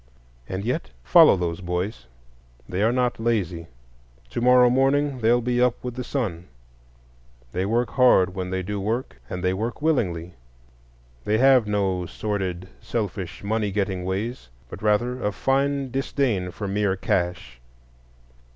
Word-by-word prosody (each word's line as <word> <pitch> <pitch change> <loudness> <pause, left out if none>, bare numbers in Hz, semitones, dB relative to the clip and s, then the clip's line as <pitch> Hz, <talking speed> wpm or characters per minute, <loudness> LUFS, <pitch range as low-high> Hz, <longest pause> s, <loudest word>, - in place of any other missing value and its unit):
And 95 +2 -4
yet 125 +8 -2
follow 65 - +7
those 85 0 -3
boys: 90 - -3 0.6
they 90 +2 -2
are 110 +2 +3
not 125 -1 0
lazy; 95 -8 -1 0.6
to - - -3
morrow 125 0 +6
morning 135 +2 +2
they'll 120 +2 +3
be 120 +1 0
up 125 -1 +3
with 125 -1 -4
the 125 +1 -5
sun; 95 - -3 1.0
they 95 +6 -1
work 120 +3 0
hard 110 -8 +4
when 90 -1 -4
they 95 0 -2
do 100 +2 -3
work, 115 +6 -3
and 90 0 -5
they 90 0 +2
work 110 +5 -3
willingly. 90 - 0 0.9
They 105 +7 +1
have 130 -2 +5
no 95 -4 0
sordid, 95 -4 -3
selfish, 100 -6 -4
money 105 0 -1
getting 95 -2 -1
ways, 95 - -4 0.2
but - - -9
rather 120 +4 +1
a 105 - +1
fine 135 +4 0
disdain 125 -7 -1
for 100 +3 -6
mere 100 -1 0
cash. 85 -10 -2
105 Hz, 145 wpm, -24 LUFS, 95-125 Hz, 1.0 s, follow